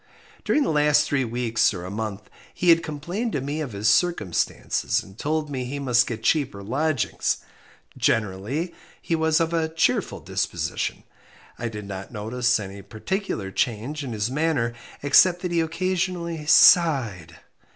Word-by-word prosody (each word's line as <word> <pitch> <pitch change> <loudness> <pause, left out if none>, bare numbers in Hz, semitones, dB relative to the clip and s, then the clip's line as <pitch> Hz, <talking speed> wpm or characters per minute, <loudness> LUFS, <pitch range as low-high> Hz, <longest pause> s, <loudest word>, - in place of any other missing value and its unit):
During 300 - +2
the - - 0
last 150 0 +4
three 145 -2 0
weeks 115 -2 +1
or 90 -1 -6
a 90 - -6
month 105 -1 -5 0.3
he 180 - +1
had 165 0 +7
complained 170 - -4
to - - 0
me 145 +3 -3
of 135 -7 -5
his 100 +2 -1
circumstances, 110 - +1
and 95 - -15
told 155 +5 -1
me 130 -2 -3
he 135 +3 -4
must 125 -3 +2
get 115 -2 -5
cheaper 125 -9 0
lodgings. 140 +4 0 0.6
Generally, 115 - -1 0.3
he 165 - -1
was 160 -1 +2
of 165 0 0
a 160 -1 +1
cheerful 160 0 0
disposition. - - -3 0.6
I 120 - -2
did 105 -2 -7
not 95 -1 -7
notice 120 +2 0
any 100 0 -7
particular 110 - -4
change 125 +7 -2
in 130 - -5
his 110 +2 -2
manner 145 -5 0 0.3
except 175 +6 +5
that 180 - -2
he 170 -1 +2
occasionally 170 -1 -2
sighed. 125 - +5
140 Hz, 155 wpm, -24 LUFS, 110-160 Hz, 0.6 s, had